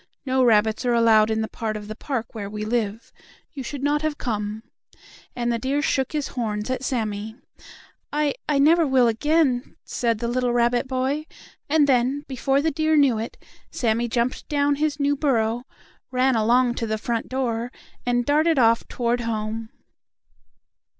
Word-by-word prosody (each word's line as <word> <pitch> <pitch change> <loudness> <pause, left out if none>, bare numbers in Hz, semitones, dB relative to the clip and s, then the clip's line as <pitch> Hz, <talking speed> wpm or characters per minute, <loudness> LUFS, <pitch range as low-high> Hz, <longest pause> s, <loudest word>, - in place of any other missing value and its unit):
No 260 -1 +2
rabbits 220 -1 +3
are 245 -1 +2
allowed 225 -2 +5
in 220 0 0
the 220 - -2
part 220 -1 -4
of 210 -1 -9
the 215 - -6
park 235 -2 -4
where 205 -3 -5
we 210 0 -5
live. 220 -1 -2 0.4
You 280 - -6
should 270 +2 -6
not 295 +1 +1
have 310 -1 -2
come," 215 -2 -3 0.7
and 240 -1 -1
the 230 - -1
deer 275 +4 -1
shook 265 0 0
his 300 -2 -2
horns 215 -2 -3
at 260 0 -3
Sammie. 220 -4 -3 0.8
"I 295 -1 +1 0.2
I 295 - +3
never 320 +3 +5
will 260 -2 +4
again," 265 +1 +1
said 230 -2 -1
the 235 +2 -3
little 245 0 0
rabbit 240 +1 +2
boy, 265 +4 -1 0.4
and 305 0 +4
then, 265 +2 +1
before 270 +1 0
the 320 - +2
deer 315 +1 +1
knew 265 -6 +4
it, 225 - -6 0.3
Sammie 235 0 0
jumped 235 +2 -1
down 285 -1 +1
his 300 0 -1
new 285 0 +2
burrow, 245 -4 0 0.4
ran 255 0 +2
along 240 +3 +3
to 230 - -2
the 220 0 -1
front 230 +1 -3
door, 245 -2 -2 0.3
and 245 0 0
darted 310 +3 +3
off 230 -2 +3
toward 240 0 -1
home. 220 -1 -3
245 Hz, 170 wpm, -23 LUFS, 225-280 Hz, 0.8 s, allowed